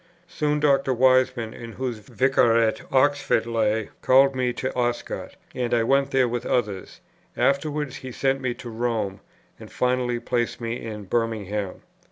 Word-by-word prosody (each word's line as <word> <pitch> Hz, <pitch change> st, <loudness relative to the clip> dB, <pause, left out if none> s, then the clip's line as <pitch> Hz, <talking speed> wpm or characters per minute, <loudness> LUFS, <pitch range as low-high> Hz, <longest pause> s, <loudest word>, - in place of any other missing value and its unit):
Soon, 150 Hz, -1 st, -1 dB
Dr. 140 Hz, -3 st, +2 dB
Wiseman, 130 Hz, -2 st, +3 dB
in 115 Hz, -1 st, -9 dB
whose 125 Hz, -4 st, -4 dB
Vicariate 115 Hz, -1 st, +2 dB
Oxford 140 Hz, -3 st, +2 dB
lay, 110 Hz, -2 st, 0 dB
called 135 Hz, +1 st, +5 dB
me 125 Hz, -1 st, +1 dB
to 130 Hz, +2 st, -4 dB
Oscott; 120 Hz, -1 st, -2 dB, 0.2 s
and 120 Hz, -1 st, 0 dB
I 115 Hz, -, +2 dB
went 135 Hz, +3 st, +2 dB
there 130 Hz, -2 st, +3 dB
with 120 Hz, 0 st, -3 dB
others; 105 Hz, -6 st, -2 dB, 0.4 s
afterwards 145 Hz, 0 st, 0 dB
he 130 Hz, -, -8 dB
sent 135 Hz, +2 st, 0 dB
me 125 Hz, -2 st, -2 dB
to 125 Hz, -1 st, -9 dB
Rome, 110 Hz, -4 st, -2 dB, 0.4 s
and -, -, -12 dB
finally 125 Hz, -1 st, 0 dB
placed 120 Hz, 0 st, -1 dB
me 115 Hz, 0 st, -4 dB
in 105 Hz, -2 st, -6 dB
Birmingham. 105 Hz, -2 st, -2 dB
120 Hz, 150 wpm, -24 LUFS, 115-130 Hz, 0.4 s, called